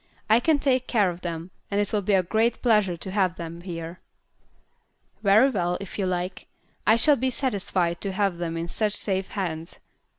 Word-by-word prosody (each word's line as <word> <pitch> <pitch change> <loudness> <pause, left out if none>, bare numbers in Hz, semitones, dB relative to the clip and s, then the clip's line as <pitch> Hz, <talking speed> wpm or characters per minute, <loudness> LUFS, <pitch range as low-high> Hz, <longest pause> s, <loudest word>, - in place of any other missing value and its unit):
"I 225 - +7
can 310 +4 +3
take 260 -3 +1
care 205 -6 +2
of 175 +1 -10
them, 170 0 -5 0.2
and 200 - 0
it 205 0 -1
will 210 - +2
be 200 +1 +2
a 185 - +3
great 225 +5 0
pleasure 210 -7 +3
to 190 - -4
have 190 -3 +1
them 170 0 -7
here." 170 -1 -6 1.2
"Very 220 +6 +5
well, 180 -5 0
if 200 +1 -8
you 190 - +1
like. 180 0 -3 0.4
I 220 - +7
shall 280 +5 +4
be 260 +2 0
satisfied 190 -9 -1
to 200 - -2
have 190 -2 0
them 165 -1 -3
in 165 +1 -3
such 210 +3 -1
safe 190 -1 -2
hands. 165 -4 -4
195 Hz, 195 wpm, -25 LUFS, 175-220 Hz, 1.2 s, I